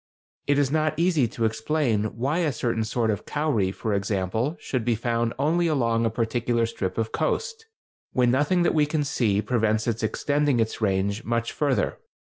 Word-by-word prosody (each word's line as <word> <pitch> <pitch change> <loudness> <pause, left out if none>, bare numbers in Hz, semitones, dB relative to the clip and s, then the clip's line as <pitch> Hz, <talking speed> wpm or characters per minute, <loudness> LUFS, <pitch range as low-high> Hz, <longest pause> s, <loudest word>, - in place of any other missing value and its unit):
It 145 0 +3
is 140 -2 +2
not 155 0 +1
easy 165 -7 +2
to 115 +1 -2
explain 110 -1 0
why 140 +8 0
a 160 -4 +1
certain 115 -2 -1
sort 110 0 0
of 105 - -5
cowry, 145 -11 0
for 105 +2 -3
example, 100 - -1
should 130 -4 -2
be 120 0 +1
found 115 +1 -1
only 165 +5 +2
along 115 -7 +1
a - - +2
particular 115 +1 0
strip 95 -5 -4
of 110 -1 -1
coast, 450 - -2 0.4
when 125 -1 +3
nothing 145 +7 +2
that - - +2
we 150 -2 +3
can 150 0 0
see 105 -7 +1
prevents 110 -1 +1
its 115 -2 -1
extending 145 +4 +1
its 115 0 -1
range 100 +2 0
much 115 0 -1
further. 145 -4 0
120 Hz, 180 wpm, -25 LUFS, 110-145 Hz, 0.4 s, It